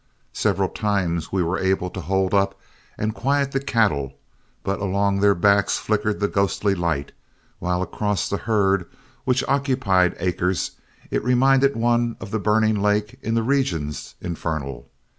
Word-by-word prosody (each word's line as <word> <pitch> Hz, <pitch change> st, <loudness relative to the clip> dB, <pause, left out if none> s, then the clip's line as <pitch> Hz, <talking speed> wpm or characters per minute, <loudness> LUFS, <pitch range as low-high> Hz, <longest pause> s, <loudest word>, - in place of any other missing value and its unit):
Several -, -, +1 dB
times 90 Hz, -6 st, -1 dB
we 95 Hz, -2 st, +1 dB
were 85 Hz, +3 st, -1 dB
able 95 Hz, -1 st, 0 dB
to 95 Hz, -, -6 dB
hold 95 Hz, +3 st, 0 dB
up 100 Hz, -1 st, +1 dB, 0.4 s
and 110 Hz, +1 st, -1 dB
quiet 140 Hz, +3 st, 0 dB
the 135 Hz, -, 0 dB
cattle, 100 Hz, -, 0 dB, 0.5 s
but 100 Hz, -, -1 dB
along 100 Hz, 0 st, +1 dB
their 100 Hz, 0 st, +4 dB
backs 100 Hz, +3 st, +3 dB
flickered 105 Hz, 0 st, -1 dB
the 100 Hz, -, +1 dB
ghostly 100 Hz, 0 st, +1 dB
light, 85 Hz, -6 st, -2 dB, 0.5 s
while 90 Hz, 0 st, 0 dB
across 105 Hz, +1 st, -1 dB
the 100 Hz, -, -1 dB
herd, 100 Hz, -5 st, +1 dB, 0.4 s
which 125 Hz, 0 st, +2 dB
occupied 125 Hz, -10 st, +2 dB
acres, 90 Hz, 0 st, -1 dB, 0.4 s
it -, -, 0 dB
reminded 135 Hz, +2 st, +4 dB
one 120 Hz, 0 st, +1 dB
of -, -, -8 dB
the 110 Hz, -, 0 dB
burning 110 Hz, 0 st, +2 dB
lake 105 Hz, +4 st, 0 dB
in 115 Hz, -, -1 dB
the 115 Hz, -, +2 dB
regions 90 Hz, -, -1 dB
infernal. 75 Hz, -7 st, -4 dB
100 Hz, 150 wpm, -23 LUFS, 90-115 Hz, 0.5 s, their